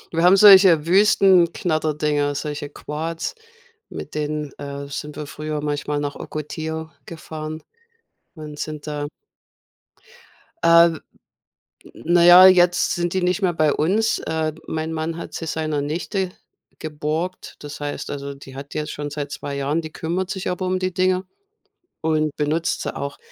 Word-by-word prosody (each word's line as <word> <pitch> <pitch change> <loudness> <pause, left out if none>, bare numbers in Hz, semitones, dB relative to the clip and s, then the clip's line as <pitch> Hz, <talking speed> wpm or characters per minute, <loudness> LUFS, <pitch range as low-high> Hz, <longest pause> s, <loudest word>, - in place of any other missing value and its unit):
Wir 165 - +2
haben 185 +2 +7
solche 190 -6 +8
Wüstenknatterdinger, 165 -6 +3
solche 145 0 -4
Quads, 160 - -5 0.6
mit - - -8
denen, 150 -1 -3
äh, 140 0 -6
sind 150 +1 -6
wir 150 - -5
früher 150 +1 -5
manchmal 145 0 -2
nach 145 -1 -3
Ocotillo 160 +1 -5 0.2
gefahren 155 -1 -7 0.7
und 150 -1 -9
sind 155 -1 -5
da 145 -1 -4 1.6
Äh, 170 0 +7 1.0
na 170 +1 +2
ja, 180 +2 +10
jetzt 175 -1 +4
sind 175 0 -2
die 185 - 0
nicht 180 +3 +1
mehr 180 -4 +1
bei 155 -3 +2
uns. 215 +8 +1
Äh, 160 -1 -2
mein 160 0 -3
Mann 160 +1 -3
hat - - -8
sie 165 - -5
seiner 155 -2 -2
Nichte 180 +6 -2 0.5
geborgt. 155 +4 -4
Das 145 0 -8
heißt 145 0 -5
also, 140 0 -5
die 135 -1 -13
hat 140 +1 -9
jetzt 150 0 -3
schon 145 0 -5
seit 145 -1 -5
2 140 +1 -5
Jahren. 145 +4 0
Die 155 -1 -9
kümmert 175 +3 -3
sich 190 -2 -3
aber 180 +1 -3
um 185 0 0
die 185 0 -2
Dinger 185 +1 +1 0.8
und 155 -2 0
benutzt 155 +3 -1
sie - - -4
auch. 140 0 -5
155 Hz, 150 wpm, -22 LUFS, 150-175 Hz, 1.6 s, ja